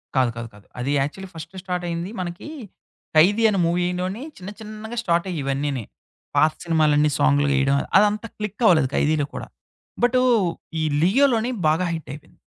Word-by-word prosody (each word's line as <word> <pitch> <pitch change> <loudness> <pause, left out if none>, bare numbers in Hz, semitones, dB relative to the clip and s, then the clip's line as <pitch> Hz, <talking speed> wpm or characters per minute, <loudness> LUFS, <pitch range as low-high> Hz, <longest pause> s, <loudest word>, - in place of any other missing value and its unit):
కాదు. 130 -2 +3
కాదు. 115 0 -5
కాదు. 105 -1 -17
అది 130 +3 -1
యాక్చువల్లీ 185 +7 -4
ఫస్ట్ 165 +3 -9
స్టార్ట్ 180 -2 -3
అయింది 170 +3 -4
మనకీ, 175 +8 -5 0.7
'ఖైదీ' 200 +8 +5
అని 200 -3 0
మూవీలోని 180 +5 -1
చిన్న 185 +1 -8
చిన్నగా 215 +2 -8
స్టార్ట్ 170 -2 +1
అయ్యి 165 -4 -3
ఇవన్నీని. 135 -2 -2 0.5
పాత 155 - +5
సినిమాలన్నీ 150 -2 +3
సాంగ్‍లో 145 0 +3
ఏయడం. 135 +1 +2 0.2
అదంతా 210 +2 +1
క్లిక్ 210 +1 -5
అవ్వలేదు 155 -10 +5
'ఖైదీలో' 150 -1 +1
కూడా. - - -6 0.6
బటూ, 250 +1 +4 0.6
ఈ - - 0 0.2
'లియోలోని' 240 - +3
బాగా 160 +4 +2
హిట్ 160 -1 -6
అయిపోయింది. 145 - -14
170 Hz, 155 wpm, -23 LUFS, 150-205 Hz, 0.7 s, ఖైదీ